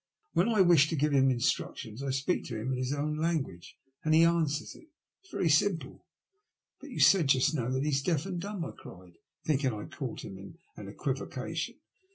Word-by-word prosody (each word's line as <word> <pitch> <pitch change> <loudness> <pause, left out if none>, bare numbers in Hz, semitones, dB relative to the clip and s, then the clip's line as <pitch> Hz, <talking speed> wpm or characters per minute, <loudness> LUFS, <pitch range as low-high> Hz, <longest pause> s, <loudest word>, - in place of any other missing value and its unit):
When 180 +7 +3
I 215 -4 +4
wish 170 -5 +6
to 165 - -1
give 150 0 +1
him 135 -1 +5
instructions 120 -1 -2
I 140 - -3
speak 135 +7 0
to 115 -4 -5
him 125 +5 -3
in 130 - -1
his 130 +1 -2
own 150 +1 -1
language, 155 - -2 0.3
and 155 0 +3
he 165 - +7
answers 160 -3 +1
it. - - -16
It 325 +4 -41
is - - -21
very 175 - 0
simple." 165 +3 +1 0.7
But - - -11
you - - -6
said 180 -7 +6
just 130 +2 +3
now 125 -5 -1
that 130 +1 0
he 150 - 0
is 140 -2 +1
deaf 160 +1 0
and 180 -3 -4
dumb," 200 -3 -4
I - - -6
cried, 90 -2 -14 0.3
blinking 140 -3 +1
I 105 - -5
had - - -10
caught - - -5
him 95 - -8
in 100 +12 -11 0.2
an - - -9
equivocation. - - -4
150 Hz, 215 wpm, -30 LUFS, 130-170 Hz, 0.7 s, he